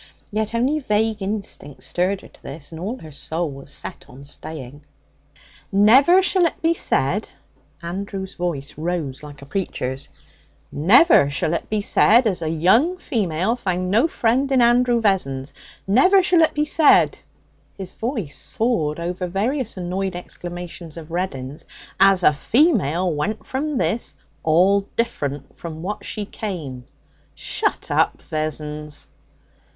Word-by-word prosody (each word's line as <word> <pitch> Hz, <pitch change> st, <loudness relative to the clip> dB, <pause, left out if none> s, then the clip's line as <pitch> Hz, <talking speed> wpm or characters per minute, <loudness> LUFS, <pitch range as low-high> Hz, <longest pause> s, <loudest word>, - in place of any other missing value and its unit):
Yet 215 Hz, +1 st, -2 dB
only 265 Hz, +6 st, +1 dB
vague 220 Hz, -4 st, 0 dB
instinct 195 Hz, -8 st, -5 dB
stirred 185 Hz, +2 st, -1 dB
her -, -, -13 dB
to -, -, -21 dB
this, 145 Hz, +2 st, -8 dB
and 160 Hz, 0 st, -8 dB
all 220 Hz, +8 st, -3 dB
her 155 Hz, -, -10 dB
soul 160 Hz, +3 st, -3 dB
was 135 Hz, +1 st, -11 dB
set -, -, -7 dB
on 135 Hz, +3 st, -13 dB
staying. 145 Hz, -1 st, -8 dB, 0.9 s
'Never 265 Hz, -, +6 dB
shall 375 Hz, -2 st, +3 dB
it -, -, -6 dB
be 330 Hz, +1 st, +2 dB
said' -, -, 0 dB, 0.5 s
Andrew's 190 Hz, +2 st, -5 dB
voice 165 Hz, -6 st, -4 dB
rose 155 Hz, -5 st, -3 dB
like 145 Hz, -2 st, -11 dB
a -, -, -10 dB
preacher's 135 Hz, -5 st, -4 dB, 0.6 s
'never 175 Hz, -, +5 dB
shall 155 Hz, +3 st, 0 dB
it 170 Hz, -, -3 dB
be 215 Hz, -1 st, 0 dB
said 235 Hz, +4 st, +5 dB
as 190 Hz, -5 st, 0 dB
a 160 Hz, -, -1 dB
young 205 Hz, -, +3 dB
female 205 Hz, -, -1 dB
found 185 Hz, -5 st, -2 dB
no 230 Hz, +10 st, +4 dB
friend 260 Hz, 0 st, +1 dB
in 265 Hz, -, +4 dB
Andrew 240 Hz, 0 st, +4 dB
Vessons; 140 Hz, -10 st, 0 dB, 0.3 s
never 365 Hz, -, +5 dB
shall 355 Hz, -1 st, +4 dB
it 320 Hz, -, +3 dB
be 300 Hz, 0 st, +1 dB
said' 305 Hz, 0 st, +4 dB, 0.6 s
his 190 Hz, -2 st, -6 dB
voice 220 Hz, -, -4 dB
soared 170 Hz, -10 st, -1 dB
over 180 Hz, +2 st, -3 dB
various 220 Hz, +6 st, -2 dB
annoyed 185 Hz, +1 st, -3 dB
exclamations 175 Hz, -2 st, -7 dB
of 165 Hz, 0 st, -9 dB
Reddin's 150 Hz, -5 st, -4 dB, 0.4 s
'as 195 Hz, -1 st, +5 dB
a 150 Hz, -, +6 dB
female 185 Hz, -, +2 dB
went 195 Hz, +9 st, -3 dB
from 285 Hz, +2 st, -2 dB
this 235 Hz, -2 st, -1 dB, 0.3 s
'all 180 Hz, +6 st, +4 dB, 0.2 s
different 145 Hz, -, -3 dB
from 160 Hz, -1 st, -8 dB
what 205 Hz, +3 st, -4 dB
she 210 Hz, -, -4 dB
came.' 155 Hz, -, -6 dB, 0.5 s
'Shut -, -, -2 dB
up, -, -, +2 dB
Vessons!' 150 Hz, -1 st, -4 dB
185 Hz, 145 wpm, -22 LUFS, 155-230 Hz, 0.9 s, Never